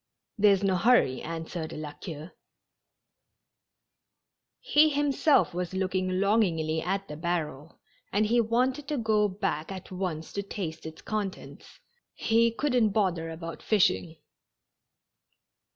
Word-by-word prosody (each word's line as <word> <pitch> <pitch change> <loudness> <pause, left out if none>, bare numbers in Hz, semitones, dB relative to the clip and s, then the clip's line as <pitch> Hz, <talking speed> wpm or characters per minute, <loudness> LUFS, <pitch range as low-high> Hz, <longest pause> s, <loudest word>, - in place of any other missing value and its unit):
There's 200 -1 +4
no 190 -2 +2
hurry," 190 - +3
answered 165 0 -5
La 150 -1 -6
Queue. 160 +1 -8 2.3
He 310 -10 +4
himself 290 - +2
was 180 +1 -3
looking 185 -1 -1
longingly 170 -7 +1
at 195 +3 -2
the 150 - -7
barrel, 160 -2 -4 0.3
and 210 +2 +2
he 235 +2 +3
wanted 255 +5 0
to 295 - -1
go 215 -3 +2
back 185 -4 -3
at 190 -1 -8
once 180 -4 -4
to 200 - -2
taste 170 -6 -6
its 160 - -11
contents; 210 -3 -5 0.4
he 230 +1 +3
couldn't 245 -2 +1
bother 185 -6 0
about 165 +1 -7
fishing. 180 -5 +2
190 Hz, 120 wpm, -28 LUFS, 165-220 Hz, 2.3 s, There's